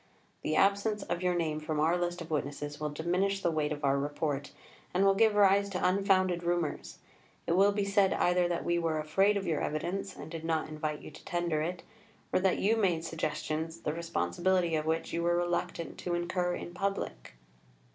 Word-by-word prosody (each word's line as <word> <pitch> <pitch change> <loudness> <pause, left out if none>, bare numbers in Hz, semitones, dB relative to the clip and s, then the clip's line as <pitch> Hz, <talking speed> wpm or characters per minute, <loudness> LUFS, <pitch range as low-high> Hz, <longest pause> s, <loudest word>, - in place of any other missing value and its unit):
The 155 - -1
absence 200 +1 +2
of 175 0 -3
your 180 -1 +1
name 155 -3 -1
from 155 0 -3
our 160 +3 +3
list 175 0 -2
of 165 0 -8
witnesses 145 0 -3
will 150 0 -2
diminish 180 +6 0
the 170 - +2
weight 155 -2 0
of 145 -1 -2
our 140 0 +3
Report, 145 0 -2 0.4
and 190 +2 +4
will 195 - +6
give 215 +1 +4
rise 200 0 +5
to 185 -1 0
unfounded 185 -2 +2
rumours; 175 -2 -2 0.5
it - - -1
will 195 +4 +5
be 200 0 -1
said 200 -1 +3
either 180 0 +2
that 175 -1 -2
we 170 0 +2
were 165 -2 0
afraid 195 +7 +2
of 195 - -3
your 160 -4 0
evidence, 180 +5 -3
and - - -9
did 165 -1 -6
not 160 -1 -1
invite 155 -1 -3
you - - -9
to 155 - -14
tender 175 -3 -1
it, 175 +3 -3 0.5
or - - +4
that 185 -1 +2
you 220 +3 +2
made 175 -6 +1
suggestions, 160 +1 -3
the 150 - -2
responsibility 175 +1 0
of 155 0 -1
which 160 +1 -1
you 170 - 0
were 175 0 +2
reluctant 175 -1 -2
to 175 -1 -2
incur 175 +1 -1
in 175 - -7
public." 195 - -3
175 Hz, 200 wpm, -31 LUFS, 155-190 Hz, 0.5 s, will